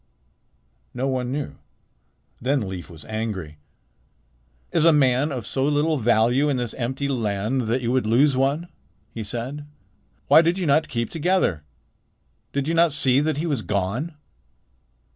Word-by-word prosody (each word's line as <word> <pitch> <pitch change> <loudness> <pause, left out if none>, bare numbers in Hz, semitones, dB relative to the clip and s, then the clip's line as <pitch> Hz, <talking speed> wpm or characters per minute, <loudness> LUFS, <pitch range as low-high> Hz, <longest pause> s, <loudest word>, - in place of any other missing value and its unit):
No 130 +2 -1
one 125 -2 -1
knew. 145 +1 -4 0.8
Then 135 +2 +1
Leif 95 -2 -7
was 80 -3 -12
angry. 105 -9 -4 1.1
"Is - - +2
a 165 - +7
man 140 0 +3
of 125 -6 -4
so 130 - -1
little 150 +1 +1
value 120 +5 +3
in 140 - 0
this 120 -3 -3
empty 130 +3 -3
land 115 -1 -1
that 125 +3 0
you 120 - 0
would 125 -4 +1
lose 135 +5 +4
one?" 140 +6 0 0.4
he 115 - -5
said. 125 +7 -5 0.6
"Why - - +8
did 170 +2 +1
you 185 - -2
not 155 +1 +3
keep 115 -1 -3
together? 165 - +1 0.9
Did 140 0 -2
you 165 - 0
not 165 -1 +4
see 135 -2 +3
that 150 0 0
he 155 - -2
was 145 -8 -1
gone? 110 - -2
130 Hz, 155 wpm, -23 LUFS, 115-150 Hz, 1.1 s, Why